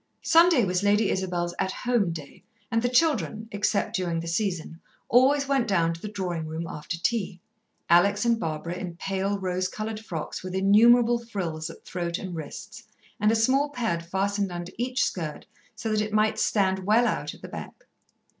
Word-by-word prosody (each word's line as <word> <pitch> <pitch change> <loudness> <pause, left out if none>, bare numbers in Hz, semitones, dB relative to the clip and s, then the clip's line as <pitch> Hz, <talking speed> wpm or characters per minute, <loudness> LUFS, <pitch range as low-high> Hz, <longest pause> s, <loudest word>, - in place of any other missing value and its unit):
Sunday 330 - +5
was 180 0 0
Lady 205 +1 +3
Isabel's 175 -2 -2
At 190 - 0
Home 235 -8 +2
day 155 -4 -9 0.3
and 230 -1 +2
the 245 - +1
children, 225 - +1
except 205 0 0
during 175 -3 -1
the 165 - -6
season, 170 -2 -2 0.3
always 275 +3 +4
went 270 -4 +1
down 170 -4 +2
to 165 - -10
the - - -5
drawing 180 -6 -3
room 160 +2 -4
after 150 +1 -5
tea, 195 -1 -1 0.5
Alex 200 +5 +4
and 235 -1 +2
Barbara 160 0 -3
in 180 -1 -6
pale, 195 +2 -2
rose 185 -1 -1
coloured 215 +3 -5
frocks 170 -8 -5
with 185 0 -6
innumerable 235 +5 +5
frills 175 -9 -4
at - - -13
throat 170 -1 -3
and 185 -3 -6
wrists, 155 -3 -8 0.4
and 210 +1 +3
a - - +2
small 265 +6 +3
pad 225 -11 -2
fastened 195 +2 -1
under 175 0 -6
each 250 +1 0
skirt 155 -5 -4 0.3
so 225 - -3
that 215 0 +2
it 215 0 -3
might 215 0 +2
stand 190 -3 +2
well 215 +5 +3
out - - -2
at - - -19
the - - -6
back. - - -9
195 Hz, 185 wpm, -26 LUFS, 175-225 Hz, 0.5 s, Sunday